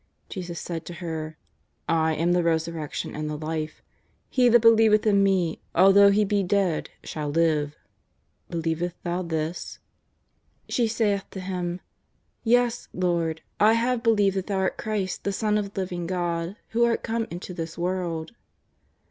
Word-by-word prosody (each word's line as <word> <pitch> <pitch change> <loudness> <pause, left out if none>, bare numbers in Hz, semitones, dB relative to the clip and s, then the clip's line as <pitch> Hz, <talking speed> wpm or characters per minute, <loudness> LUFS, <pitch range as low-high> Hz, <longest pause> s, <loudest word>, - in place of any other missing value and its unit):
Jesus 175 -3 -5
said 170 -2 -5
to 175 - -7
her: 160 -2 -5 0.5
"I 160 -1 +2
am 165 +3 +1
the 180 - +3
resurrection 165 -2 -2
and 150 0 -3
the 150 - -3
life; 155 0 -4 0.5
he 250 -2 +4
that 240 +1 +7
believeth 225 -2 +6
in 200 -2 +4
Me, 185 -4 +1
although 195 +3 +7
he 205 +1 +3
be 205 0 +1
dead, 190 -3 0
shall 150 -2 -4
live 150 -2 +1 0.7
Believest 165 +1 -2
thou 175 +1 -1
this 165 -1 -3 0.5
?" - - -43
She 240 -2 +2
saith 210 -3 0
to 190 - -7
Him: 180 -1 -3 0.6
"Yea, 245 +1 +4 0.2
Lord, 170 -3 0 0.2
I 215 +2 +6
have 235 +1 +1
believed 205 -4 +3
that 190 - -3
Thou 200 -2 -1
art 190 0 0
Christ 205 -4 -2
the 200 - 0
Son 210 +2 0
of 205 -1 -2
the 195 - 0
living 175 -2 -4
God, 175 0 -2
who 235 +1 +2
art 235 -1 +2
come 225 0 -1
into 175 +1 -7
this 165 -1 -6
world." 170 -2 -2
180 Hz, 160 wpm, -25 LUFS, 165-205 Hz, 0.7 s, that